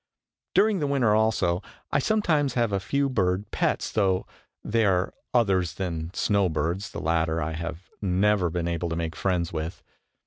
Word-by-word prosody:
During 210 -2 +4
the 145 - 0
winter 130 -6 +3
also, 105 -5 +2 0.3
I - - +3
sometimes 155 - +1
have 120 -3 +1
a 100 - +1
few 140 +8 0
bird 95 -5 0
pets, - - 0
though 95 -3 +1 0.4
they 115 +1 +1
are 95 -2 +2 0.2
others 95 - +2
than 85 -3 -3
snow 100 -3 +2
birds. 85 +6 -2
The - - -6
latter 80 0 +1
I 80 0 -2
have 85 +2 -6
never 95 -1 +2
been 85 0 -2
able 85 0 -2
to 80 - -2
make 80 -1 -3
friends 90 -1 -1
with. 80 +2 -4
95 Hz, 170 wpm, -26 LUFS, 85-110 Hz, 0.4 s, During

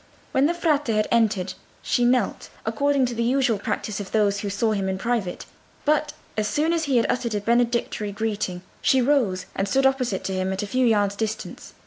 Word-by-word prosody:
When 270 +2 +3
the 340 - 0
Frate 305 -5 +1
had 215 -2 +1
entered 215 -5 +2 0.3
she 245 - +2
knelt, 245 -4 +1 0.2
according 270 +5 +2
to 245 - -3
the 235 - -2
usual 245 -2 +2
practice 210 0 -3
of 200 -2 -7
those 205 -2 +2
who 205 -1 -3
saw 210 +3 0
him 195 -2 -1
in 190 - -1
private; 215 -4 -2 0.4
but 300 0 +2 0.2
as 215 -1 0
soon 300 +10 +1
as 325 -1 0
he 270 -3 +2
had 230 - +3
uttered 235 -3 -1
a - - +1
benedictory 235 -1 0
greeting 200 -4 -3 0.2
she 265 - +4
rose 245 -8 +2
and 195 - -1
stood 270 +6 +2
opposite 255 -7 +1
to 190 - -3
him 185 0 -1
at 190 - -3
a - - -2
few 255 +4 +1
yards' 205 -3 +2
distance. 220 +1 -5
225 Hz, 205 wpm, -24 LUFS, 205-255 Hz, 0.4 s, she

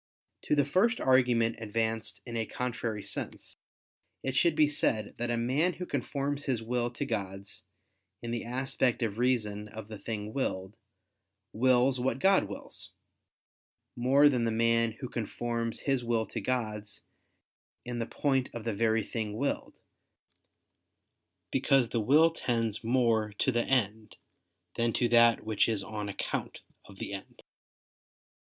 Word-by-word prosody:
To - - +2
the 145 -2 +3
first 205 - +2
argument 125 -3 +3
advanced 110 0 -2
in 120 -2 -6
a 115 -1 -1
contrary 115 -4 -3
sense, - - -5 0.7
it 135 -1 -2
should 160 +4 +3
be 150 -1 +5
said 110 -7 0
that 120 0 -1
a 120 - 0
man 135 +10 +1
who 180 - -6
conforms 145 -3 -3
his 125 -5 -1
will 120 +1 -1
to 120 - -4
God's, 100 -2 -5 0.6
in 115 - -4
the 120 - -2
aspect 130 0 0
of 110 -1 -2
reason 105 -5 0
of 110 0 -9
the 110 -2 -8
thing 105 -1 -5
willed, 95 -7 -2 0.8
wills 125 +2 +3
what 125 -1 0
God 190 - +4
wills, 100 - -8 1.1
more 135 +4 +5
than 125 -5 +2
the 115 - +1
man, 115 0 +2
who 125 +3 -7
conforms 115 0 -3
his 135 -3 0
will 115 -1 0
to - - -5
God's, 105 -5 -3 0.8
in 120 -1 -4
the 115 - -2
point 135 -3 0
of 115 - -5
the 115 -1 -1
very 110 +1 +2
thing 110 -1 -4
willed; 140 +3 -2 1.8
because 135 -2 +3
the 115 - 0
will 150 +9 +5
tends 115 -7 0
more 115 -3 +2
to 130 - +2
the 120 -1 +1
end, 110 -4 0 0.6
than 115 -1 +1
to 120 - +2
that 115 -1 +5
which 110 +1 +2
is 105 -3 +1
on 105 0 -5
account 100 - -4 0.2
of 95 - -14
the 100 - -5
end. 95 - -9
115 Hz, 150 wpm, -30 LUFS, 110-130 Hz, 1.8 s, be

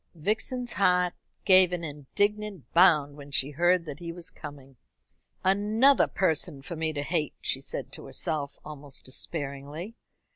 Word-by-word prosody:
Vixen's 220 +8 -1
heart 180 -1 +3 0.3
gave 185 -2 +7
an 175 -1 -3
indignant 200 +6 -2
bound 155 -5 +5
when 145 -1 -11
she 140 0 +1
heard 175 +3 +3
that 150 -1 -7
he 170 -1 -5
was 170 0 -6
coming. 140 -3 -10 0.7
"Another 215 +8 +4
person 160 -5 0
for 170 - -6
me 160 0 -1
to 145 -2 -3
hate," 155 -2 -1
she - - -1
said - - -5
to - - -7
herself, 145 -3 -2
almost 145 -2 -8
despairingly. 145 - -5
165 Hz, 145 wpm, -28 LUFS, 145-185 Hz, 0.7 s, gave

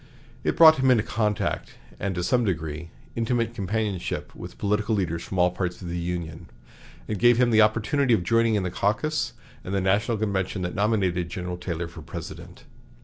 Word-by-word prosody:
It - - 0
brought 160 -1 +9
him 130 0 +2
into 120 -4 +4
contact 105 -2 -1 0.2
and, 95 -1 -2
to 90 - -2
some 120 +6 +2
degree, 80 -4 -3 0.3
intimate 115 0 0
companionship 105 -2 -3
with - - -10
political 105 +2 0
leaders 85 -4 -1
from 95 - -6
all 90 0 +4
parts 90 -1 -3
of 90 - -7
the 85 - -3
Union, 85 -2 -5 0.6
and 105 -3 -3
gave 120 -1 +5
him 125 -1 +3
the 110 -1 +6
opportunity 115 +4 +3
of 90 - -2
joining 115 +3 +3
in 100 - +1
the 90 - -2
caucus 135 - 0 0.3
and 95 - -3
the - - +2
national 100 +5 +1
convention 95 -2 -1
that 90 - -3
nominated 95 -5 +1
General 90 +1 -4
Taylor 85 -1 -4
for 85 0 -11
President. 75 - -9
100 Hz, 185 wpm, -25 LUFS, 90-115 Hz, 0.6 s, brought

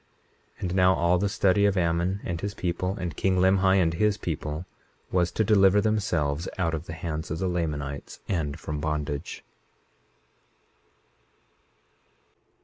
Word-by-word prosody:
21:36 - - -22
And 90 0 -2
now 95 0 +5
all 85 +1 +2
the 100 +1 +1
study 100 +1 +3
of 100 -1 0
Ammon 85 +3 0
and 85 -1 -4
his 100 0 -4
people, 90 +2 -2
and 90 -4 -4
king 95 -1 +1
Limhi 95 +1 +4
and 85 -4 +3
his 105 +4 +1
people, 80 -1 -4 0.5
was 90 -1 +2
to 110 - +1
deliver 100 -1 +5
themselves 90 -8 0
out 85 -3 0
of 80 +1 -4
the 80 - -5
hands 80 -1 -4
of 80 - -2
the 95 +2 -1
Lamanites 75 -5 -3
and 80 -4 -2
from 75 -1 -4
bondage. 75 -2 -3
90 Hz, 145 wpm, -26 LUFS, 80-95 Hz, 0.5 s, now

